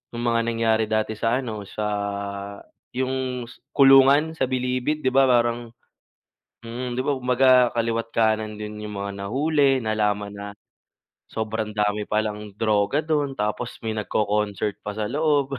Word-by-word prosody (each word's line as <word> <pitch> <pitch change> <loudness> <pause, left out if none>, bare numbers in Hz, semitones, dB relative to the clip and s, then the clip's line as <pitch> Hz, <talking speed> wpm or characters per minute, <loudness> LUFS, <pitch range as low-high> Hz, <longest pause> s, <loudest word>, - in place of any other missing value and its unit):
no'ng 120 - -4
mga 115 -1 +2
nangyari 115 -1 +1
dati 110 0 0
sa 115 +2 +1
ano, 110 -4 -5
sa, 105 - -4 1.1
yung 130 -1 -2
s - - -16
kulungan 140 +3 +6
sa 130 -1 0
bilibid, 130 +4 -1
'di - - +5
ba 135 0 +6
parang 120 -1 +1 1.0
mm, 120 +2 -4
'di 130 - +1
ba, 145 - +2
kumbaga 125 -1 +4
kaliwa't 115 0 -1
kanan 110 -1 +1
din 105 0 -6
yung 105 - -6
mga 100 0 -3
nahuli, 140 +3 +2
nalaman 105 -2 0
na, 100 0 -7 0.8
sobrang 110 -1 -3
dami 105 0 0
palang 105 -1 -2
droga 105 +5 +1
do'n, 145 -4 -1
tapos 105 +3 -3
may 110 - -1
nagko-concert 105 -1 -1
pa 105 0 -5
sa 110 - -1
loob. 145 -3 +1
115 Hz, 145 wpm, -24 LUFS, 105-130 Hz, 1.1 s, kulungan